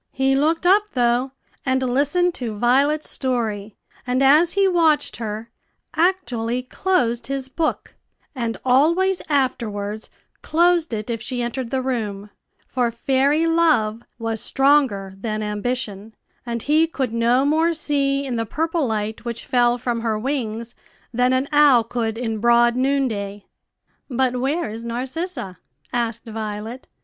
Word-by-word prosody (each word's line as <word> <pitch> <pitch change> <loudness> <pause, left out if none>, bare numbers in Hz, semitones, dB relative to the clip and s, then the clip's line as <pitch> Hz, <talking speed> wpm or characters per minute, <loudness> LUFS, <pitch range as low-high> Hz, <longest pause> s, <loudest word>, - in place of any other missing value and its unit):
He 270 0 +2
looked 320 +5 +1
up 390 +4 +6
though, 245 +1 +1 0.3
and 260 0 +1
listened 290 +8 +1
to 230 -7 -5
Violet's 275 +7 +2
story, 220 -6 -2 0.3
and, 255 +2 +1
as 310 +5 +5
he 395 0 +3
watched 325 -5 +2
her, 220 0 -5 0.4
actually 250 -9 0
closed 245 -7 0
his 270 -1 -2
book, 315 +4 -2 0.4
and 235 -4 -3
always 335 +9 +3
afterwards 220 -7 -1 0.3
closed 340 0 +2
it 220 +1 -3
if 230 -1 -3
she 245 +1 -3
entered 240 +1 -3
the 260 0 -1
room; 210 -6 -3 0.3
for 245 -2 0
fairy 275 +6 +1
Love 315 -10 +2 0.2
was 225 -2 -3
stronger 270 -9 +2
than 215 +1 -3
Ambition, 210 -1 -3 0.3
and 235 -1 -3
he 310 +3 +3
could 265 -7 -3
no 235 +3 +2
more 320 +3 +3
see 280 -3 0
in 250 -3 -3
the 225 - -1
purple 320 +2 -1
light 220 -1 -3
which 235 -1 -5
fell 245 -1 +2
from 240 -1 -2
her 225 -2 0
wings 235 -2 -3 0.4
than 250 +2 +2
an 260 +2 +1
owl 290 -5 +6
could 225 -1 -3
in 225 -2 -3
broad 235 +1 +4
noonday. 235 -7 -1 0.6
"But 250 -1 0
where 280 -1 -1
is 225 +2 -7
Narcissa?" 250 - -4 0.3
asked 235 -1 -2
Violet. 220 +2 -6
250 Hz, 140 wpm, -22 LUFS, 225-285 Hz, 0.6 s, up